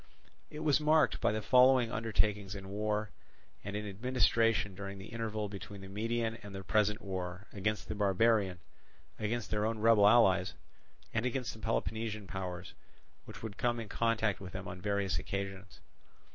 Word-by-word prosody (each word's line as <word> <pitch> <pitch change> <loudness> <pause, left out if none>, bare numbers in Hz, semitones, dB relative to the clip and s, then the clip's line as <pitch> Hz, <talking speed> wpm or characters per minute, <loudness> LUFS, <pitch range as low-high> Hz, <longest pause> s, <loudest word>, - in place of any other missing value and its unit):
It 150 - -8
was 155 -2 +3
marked 155 +1 +3
by - - +3
the 110 0 -2
following 125 0 +5
undertakings 105 -3 0
in 95 -1 -8
war 105 +1 -1 0.5
and 100 +1 -5
in 105 0 -3
administration 115 -1 +2
during 100 +1 -6
the 95 +1 -9
interval 110 -2 -3
between 100 0 -8
the 95 - -9
Median 115 +2 -2
and 100 -2 -9
the 95 - -6
present 105 +1 +1
war, 95 0 -4
against 105 +1 -2
the - - -3
barbarian, 100 -1 +2 0.6
against 110 +2 -2
their 105 -1 +1
own 110 +1 0
rebel 110 -2 +6
allies, 95 -5 +5 0.6
and 110 - +1
against 125 0 -2
the 110 - -12
Peloponnesian 110 -1 -2
powers 90 -1 -5 0.5
which - - -11
would 110 -2 -6
come 120 -1 +1
in 110 -3 -6
contact 110 -3 +1
with 95 -2 -9
them - - -6
on 90 0 -7
various 100 -5 0
occasions. 95 -2 -5
105 Hz, 165 wpm, -33 LUFS, 100-115 Hz, 0.6 s, rebel